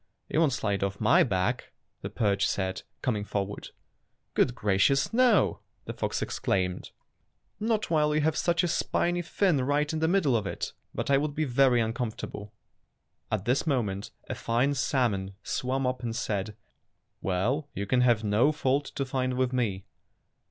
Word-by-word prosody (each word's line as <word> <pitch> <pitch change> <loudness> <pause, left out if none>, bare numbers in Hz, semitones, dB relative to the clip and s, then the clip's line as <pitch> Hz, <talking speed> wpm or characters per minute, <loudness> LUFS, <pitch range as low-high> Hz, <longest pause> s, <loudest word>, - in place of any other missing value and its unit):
"You 155 - +1
won't 160 -4 +4
slide 105 -5 -1
off 100 0 -2
my 110 - +5
back," 95 -6 0 0.3
the - - -4
perch 100 -2 +1
said, 95 -1 -2 0.2
coming 110 -6 0
forward. 100 -1 -4 0.6
"Good 125 - +2
gracious, 105 - +2
no!" 225 - +4 0.3
the - - -5
fox - - -2
exclaimed, 90 -1 -1 0.7
"not 215 -3 0
while 150 -2 +3
you 155 - +2
have 155 +1 +1
such 170 +1 +1
a - - +2
spiny 175 +1 0
fin 175 -4 +1
right 145 +3 +1
in 160 - -1
the 160 - +2
middle 165 -8 +3
of 105 -3 0
it; - - -4 0.2
but - - -2
I 135 - +5
would 145 0 -2
be 155 - 0
very 130 -1 +4
un 110 0 -2
comfortable." 110 -4 -5 0.8
At 105 -2 -1
this 130 +6 +1
moment 105 -8 -1 0.2
a - - -3
fine 125 +5 +1
salmon 110 -8 0
swam 130 +1 -1
up 125 0 -1
and 115 -2 -3
said, 105 -2 -3 0.6
"Well, 120 - 0
you 100 - -2
can 125 +5 +2
have 120 -3 +3
no 110 +8 +3
fault 145 -1 0
to 135 - -1
find 130 -1 -1
with 130 0 0
me." 105 -7 -1
125 Hz, 170 wpm, -28 LUFS, 105-145 Hz, 0.8 s, my